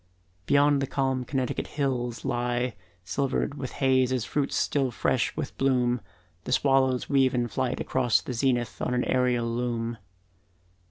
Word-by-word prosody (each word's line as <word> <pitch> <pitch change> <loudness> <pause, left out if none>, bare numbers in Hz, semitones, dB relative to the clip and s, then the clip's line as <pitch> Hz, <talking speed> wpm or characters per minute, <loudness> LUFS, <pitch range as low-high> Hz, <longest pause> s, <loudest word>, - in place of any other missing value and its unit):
Beyond 145 0 +4
the 135 - -1
calm 135 -2 0
Connecticut 130 -1 -2
the - - -14
hills 125 -4 -2
lie 120 0 -1 0.3
Silvered 135 +8 -1
with 135 -3 -6
haze 130 -2 +2
as 125 -3 0
fruits 140 +2 -1
still 135 -3 +1
fresh 125 +2 0
with 155 -4 -4
bloom, 125 -3 +2 0.4
The - - -4
swallows 135 -2 +2
weave 135 -2 +3
in 120 -1 +1
flight 125 +2 -2
across 125 -3 +2
the 125 - -6
zenith 120 -1 0
On 125 - 0
an 125 - +1
aerial 125 -2 +1
loom. 115 -1 -2
130 Hz, 155 wpm, -27 LUFS, 120-135 Hz, 0.4 s, Beyond